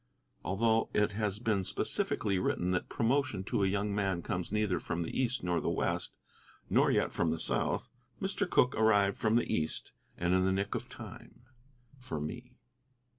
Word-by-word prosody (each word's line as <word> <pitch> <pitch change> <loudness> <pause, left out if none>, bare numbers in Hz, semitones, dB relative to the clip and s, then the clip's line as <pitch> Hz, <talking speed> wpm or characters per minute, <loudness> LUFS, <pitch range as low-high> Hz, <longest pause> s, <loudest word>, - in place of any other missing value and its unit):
Although 110 +5 +2
it 105 0 +3
has 105 -1 -1
been 110 -4 0
specifically 95 +1 0
written 90 0 0
that 90 - -1
promotion 120 -4 +1
to 100 - 0
a - - +4
young 100 +1 0
man 95 -4 0
comes 90 +1 -3
neither 105 -5 +1
from 85 +2 -2
the 80 - -5
East 130 -1 0
nor 85 -1 +1
the - - 0
West, - - -1 0.6
nor - - +5
yet - - +1
from 85 - +1
the 80 0 -1
South, - - -1 0.3
Mr. - - -1
Cooke 125 - +4
arrived 105 -3 +3
from 110 +1 +2
the 120 - +3
East, 80 -1 -2 0.3
and 90 +1 +1
in 95 0 +4
the 95 - +2
nick 100 +1 -1
of - - -4
time - - -11 0.6
for 105 -12 -5
me. 125 +12 -6
100 Hz, 180 wpm, -32 LUFS, 90-110 Hz, 0.6 s, nor